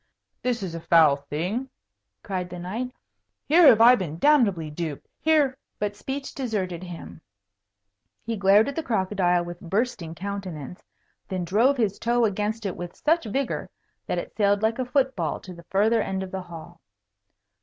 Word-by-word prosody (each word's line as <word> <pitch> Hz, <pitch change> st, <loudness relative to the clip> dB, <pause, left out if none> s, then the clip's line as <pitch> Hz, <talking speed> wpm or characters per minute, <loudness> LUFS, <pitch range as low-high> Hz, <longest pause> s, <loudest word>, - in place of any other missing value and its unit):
"This 240 Hz, -4 st, -1 dB
is 180 Hz, -3 st, -4 dB
a 165 Hz, -, -4 dB
foul 160 Hz, -3 st, +5 dB
thing!" 170 Hz, -, -3 dB, 0.5 s
cried 180 Hz, -2 st, -3 dB
the 180 Hz, -, -7 dB
knight. 215 Hz, +9 st, -4 dB, 0.5 s
"Here 330 Hz, +2 st, +6 dB
have 225 Hz, -4 st, +7 dB
I 240 Hz, +2 st, +9 dB
been 175 Hz, -9 st, -2 dB
damnably 200 Hz, -, +3 dB
duped. 155 Hz, -2 st, -5 dB
Here 295 Hz, -4 st, +2 dB
" -, -, -54 dB
but 205 Hz, 0 st, -2 dB
speech 270 Hz, +6 st, -5 dB
deserted 200 Hz, -10 st, -3 dB
him. 165 Hz, -, -9 dB, 1.0 s
He 230 Hz, 0 st, -2 dB
glared 200 Hz, +2 st, +5 dB
at 280 Hz, -, -4 dB
the 325 Hz, -, -1 dB
crocodile 190 Hz, -, +1 dB
with 175 Hz, +2 st, -8 dB
a -, -, -11 dB
bursting 180 Hz, -4 st, -2 dB
countenance, 180 Hz, -4 st, -6 dB, 0.4 s
then 185 Hz, -2 st, -3 dB
drove 235 Hz, +10 st, +3 dB
his 210 Hz, -5 st, 0 dB
toe 235 Hz, 0 st, +2 dB
against 210 Hz, +2 st, -2 dB
it 190 Hz, -, -2 dB
with 175 Hz, 0 st, -7 dB
such 325 Hz, -1 st, +1 dB
vigour 265 Hz, +5 st, -2 dB, 0.4 s
that -, -, -1 dB
it -, -, -5 dB
sailed 205 Hz, -1 st, +2 dB
like 225 Hz, +3 st, +1 dB
a 255 Hz, -, 0 dB
foot 265 Hz, 0 st, +1 dB
ball 165 Hz, -4 st, -2 dB
to 185 Hz, -, -10 dB
the 170 Hz, -1 st, -14 dB
farther 215 Hz, +3 st, +3 dB
end 190 Hz, -1 st, -2 dB
of 190 Hz, -, -8 dB
the 190 Hz, -, -4 dB
hall. 170 Hz, -1 st, -11 dB
200 Hz, 175 wpm, -25 LUFS, 175-240 Hz, 1.0 s, I